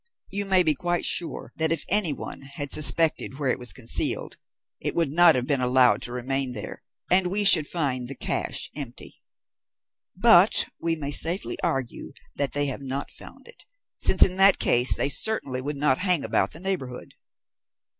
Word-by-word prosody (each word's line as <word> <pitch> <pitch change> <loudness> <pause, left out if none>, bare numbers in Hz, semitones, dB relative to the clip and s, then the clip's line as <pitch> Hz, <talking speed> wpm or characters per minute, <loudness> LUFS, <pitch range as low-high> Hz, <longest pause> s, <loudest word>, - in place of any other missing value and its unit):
You 200 +1 -2
may 190 -2 +3
be 155 -2 +3
quite 175 +4 -3
sure 170 - 0
that 160 0 0
if 165 -3 -2
anyone 180 -7 -2
had 140 +1 -7
suspected 155 -2 +2
where 140 -3 -1
it - - -4
was 125 -1 0
concealed, 120 -3 +3 0.4
it - - -3
would 165 -5 +1
not 170 +1 +5
have 125 -1 -2
been 135 -1 0
allowed 125 0 +3
to 120 - -3
remain 130 +1 -3
there, 105 -2 -8 0.3
and 185 0 +4
we 205 +3 0
should 160 -7 +5
find 130 -7 -3
the 140 - -7
cache - - -4
empty. 140 -5 -10 0.9
But 190 -1 +4
we 165 -1 -1
may 145 -2 -6
safely 170 +6 -1
argue 135 -8 -4 0.2
that 140 -3 -3
they 145 0 +1
have 135 -1 -5
not 135 +1 -6
found - - -12
it, 480 - -15 0.3
since - - +4
in 185 - +1
that 195 0 +5
case 120 +1 +2
they - - -1
certainly 140 -5 -2
would 145 +2 -5
not 140 -2 0
hang 180 -5 +1
about - - 0
the 160 - -13
neighbourhood." 170 -10 -5
145 Hz, 175 wpm, -24 LUFS, 130-175 Hz, 0.9 s, not